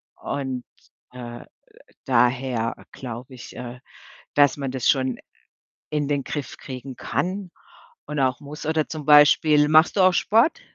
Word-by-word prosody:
und, 130 -3 -4 0.5
äh, 120 -1 -8
äh, - - -15 0.6
daher 125 -2 +1 0.2
glaube 125 0 -8
ich, 120 - -11
äh, 125 0 -8 0.5
dass 145 -1 +4
man 135 -2 -3
das 130 -3 0
schon 130 -2 +1 0.7
in 150 -2 -1
den 140 -2 -1
Griff 145 -3 -5
kriegen 130 -2 -8
kann 185 0 -3 0.6
und 150 -1 -5
auch 130 +1 +1
muss. 145 +1 -9
Oder 155 -1 0
zum 155 -3 -6
Beispiel 150 0 +6
machst 155 +5 +5
du - - +3
auch 185 0 +6
Sport? 230 - +2
140 Hz, 145 wpm, -23 LUFS, 125-150 Hz, 0.7 s, Beispiel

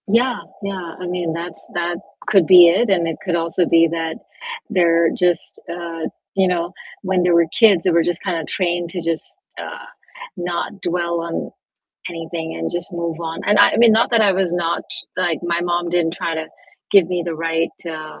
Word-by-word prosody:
Yeah, 240 +4 +2 0.2
yeah, 185 -4 -5
I 180 - -6
mean, 175 -2 -2
that's 170 0 -6
that 175 0 -1 0.3
could 190 -6 +4
be 180 -2 +9
it, 200 +7 +2
and 175 -4 +2
it 165 - -3
could 180 -2 0
also 170 +1 +1
be 165 0 +5
that 165 -1 -2 0.5
they're 170 -2 +3
just, 175 -2 0
uh 170 -1 -5 0.3
you 190 -1 +3
know, 175 -1 -1 0.3
when 185 -2 +1
they 180 - +2
were 170 0 +5
kids, 205 -7 +6
they 185 - +2
were 170 0 +4
just 175 0 -2
kinda 170 -4 -1
trained 175 -1 -1
to 180 - -4
just, 165 -1 -2 0.3
uh, - - -7 0.5
not 175 +2 -4
dwell 170 -1 -1
on 170 0 -4 0.6
anything 165 -1 -5
and - - -3
just 175 0 -4
move 170 -1 -3
on, 165 -1 -4
and 205 0 +4
I - - +7
I - - 0
mean, 230 -1 +6
not 225 +2 +3
that 230 -2 +4
I 200 -2 +4
was 185 -2 0
not 170 -1 -1 0.3
like, 175 -3 0
my 170 0 0
mom 175 0 -1
didn't 170 -1 +1
try 165 -2 -3
to 160 0 -4 0.4
give 195 -4 +6
me 180 -1 -1
the 170 -1 -3
right, 165 +1 -1 0.2
uh 155 -1 -7
175 Hz, 200 wpm, -20 LUFS, 165-180 Hz, 0.6 s, be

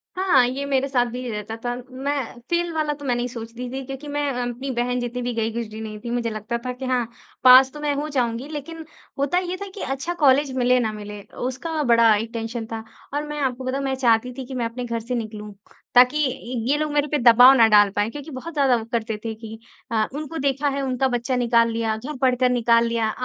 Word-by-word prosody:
हाँ। 360 -10 +4
ये 270 +3 -3
मेरे 275 -1 +1
साथ 250 -3 +2
भी 250 0 -5
रहता 210 +1 -5
था 245 - -1 0.2
मैं 265 -2 -3
फ़ेल 345 0 0
वाला 305 -2 0
तो 285 0 -10
मैं 245 -2 +1
नहीं 240 0 -1
सोचती 235 0 -7
थी। 270 - -4
क्योंकि 270 +2 -7
मैं 290 0 -1
अ, 245 -1 -2
अपनी 260 +3 -5
बहन 245 0 -1
जितनी 245 0 -4
भी 245 0 -2
गई 225 -1 -1
गुजरी 220 -2 -5
नहीं 215 -1 -7
थी। 235 - -3
मुझे 235 -1 -1
लगता 215 +2 -4
था 250 - -1
कि 260 +1 -7
हाँ, 250 -2 0 0.4
पास 260 +1 +8
तो 300 - -8
मैं 295 -1 0
हो 295 +2 -2
जाऊँगी। 245 -1 -1
लेकिन 315 +2 -7 0.3
होता 280 +6 +1
ये 365 0 -2
था 400 - -4
कि 405 - -7
अच्छा 275 +6 -3
कॉलेज 275 +1 +4
मिले 250 0 +3
ना 220 -2 0
मिले, 210 -1 -8
उसका 260 +9 -4
बड़ा 230 -3 +5
एक 220 +2 -3
टेंशन 225 0 -4
था। 225 -1 -4 0.3
और 290 +1 -1
मैं 295 0 -5
आपको 260 -1 -1
बताऊँ 265 +2 -2
मैं 270 -1 -1
चाहती 245 -1 +2
थी 260 - -5
कि 265 - -9
मैं 240 -2 -1
अपने 245 +2 -4
घर 235 -1 -2
से 240 +2 -4
निकलूँ। 215 -2 -6 0.4
ताकि 250 +4 +6
इ 255 -1 -6
ये 285 - +4
लोग 305 0 -1
मेरे 295 0 +2
पर 295 - 0
दबाव 245 +3 +8
न 225 - +8
डाल 205 -1 +6
पाएँ। 205 +2 0
क्योंकि 295 +3 -8
बहुत 275 +6 -7
ज़्यादा 275 -4 +3
वो 225 -2 -3
करते 225 -2 -1
थे 225 - -2
कि, 220 0 -10 0.3
अ, 220 -1 +1
उनको 310 +2 -5
देखा 275 +1 0
है 275 0 -2
उनका 265 0 0
बच्चा 245 +1 -1
निकाल 235 -1 +3
लिया 225 -1 -1
घर 265 +6 -7
पढ़कर 255 -1 +3
निकाल 235 -1 +3
लिया, 230 -1 0
250 Hz, 240 wpm, -23 LUFS, 230-275 Hz, 0.4 s, पास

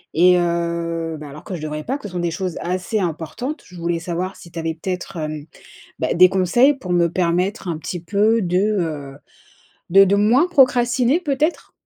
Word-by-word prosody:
et 180 +2 +6
heu, 170 -1 -2
ben, 150 - -8
alors 150 +2 -11
que - - -7
je 165 - -7
devrais 150 0 -4
pas, 265 +3 -1
que 210 - -7
ce 185 - -12
sont 180 - -2
des 175 -1 -1
choses 180 0 -3
assez 185 +5 -2
importantes. 185 - -4
Je 180 - -15
voulais 170 0 -1
savoir 180 +3 -4
si 170 - -13
tu 170 - -11
avais 165 0 -2
peut-être, 180 +2 -5
hem, 155 -2 -4 0.5
bah, - - 0
des 185 +1 +7
conseils 195 +10 +3
pour 190 -10 -5
me 175 -1 +3
permettre 180 +3 -1
un 165 -2 -2
petit 175 +2 -5
peu 210 +6 +2
de, 180 0 +1
heu, 165 -9 -1 0.8
de 195 +2 +8
de 195 +1 +3
moins 235 - +4
procrastiner 255 -2 +3
peut-être? 300 +1 -1
180 Hz, 195 wpm, -20 LUFS, 170-210 Hz, 0.8 s, de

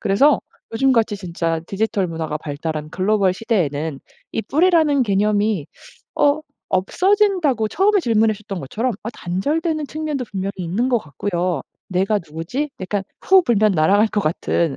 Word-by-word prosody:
그래서 260 +9 +4 0.4
요즘같이 230 -4 +2
진짜 170 -3 -2
디지털 200 -1 -1
문화가 160 -2 -3
발달한 155 +1 -5
글로벌 195 0 +2
시대에는 160 - -1 0.3
이 225 - -1
뿌리라는 315 -3 +3
개념이 205 - +1 0.5
어 290 +1 +4 0.3
없어진다고 345 - +2
처음에 400 - +3
질문하셨던 215 - 0
것처럼 225 - -2
어 220 - -4
단절되는 300 - -2
측면도 300 -4 -3
분명히 195 0 -3
있는 190 +9 -1
것 240 - +3
같고요. 175 0 -2 0.3
'내가 195 +3 +1
누구지?' 170 - -3
약간 195 +1 -2 0.2
후 380 -1 +5
불면 215 -4 +3
날아갈 195 +7 +4
것 210 - -2
같은 165 -3 0
210 Hz, 335 characters per minute, -20 LUFS, 175-265 Hz, 0.5 s, 후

